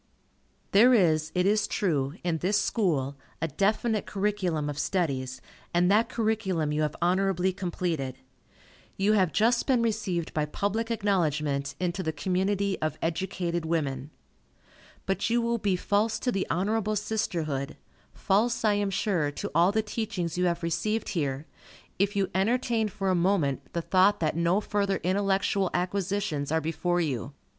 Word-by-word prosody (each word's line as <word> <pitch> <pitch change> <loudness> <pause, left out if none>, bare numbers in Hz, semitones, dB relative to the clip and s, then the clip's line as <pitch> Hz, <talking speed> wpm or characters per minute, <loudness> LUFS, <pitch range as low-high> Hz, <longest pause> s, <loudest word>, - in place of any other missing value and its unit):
There 240 +5 +6
is, 160 -6 +2
it 180 0 +2
is 205 +1 +2
true, 150 -7 0
in 170 -2 0
this 200 +5 +2
School, 145 - 0 0.2
a 165 - -1
definite 210 - 0
curriculum 190 -7 -1
of 145 0 -4
studies, 135 -7 -1 0.3
and 180 +2 +4
that 215 +3 +3
curriculum 210 -9 0
you 150 +1 0
have 150 -1 -1
honorably 185 0 +2
completed. 170 -8 -3 0.8
You 200 +2 +3
have 190 -6 +3
just 230 +2 +2
been 250 -4 +3
received 200 -7 -1
by 150 -1 0
public 205 +8 -2
acknowledgment 150 -10 0
into 180 +1 -1
the 160 -3 -1
community 190 +5 -1
of 155 -1 -1
educated 170 0 -2
women. 145 -4 -2 1.0
But 195 +3 0
you 235 +1 +3
will 235 0 0
be 200 -3 +1
false 210 +4 +1
to 250 - 0
the 195 -4 -1
honorable 215 +4 0
sisterhood, 165 -10 -2 0.3
false, 225 +4 +1
I 210 - +4
am 205 -1 0
sure, 185 -6 0
to - - -5
all 170 +4 +4
the 220 +1 +1
teachings 205 -6 -3
you 180 0 +1
have 170 -1 0
received 215 +7 -1
here, 145 -4 -2 0.5
if 200 +1 +1
you 195 -1 0
entertain 225 +3 +1
for 195 -1 -2
a - - +3
moment 170 -6 0
the 170 - -2
thought 190 +4 +4
that 155 -2 0
no 170 +4 +2
further 200 -2 0
intellectual 195 0 +1
acquisitions 180 -5 -1
are 160 - +3
before 175 +2 -1
you. 140 -4 -3
185 Hz, 155 wpm, -27 LUFS, 160-205 Hz, 1.0 s, There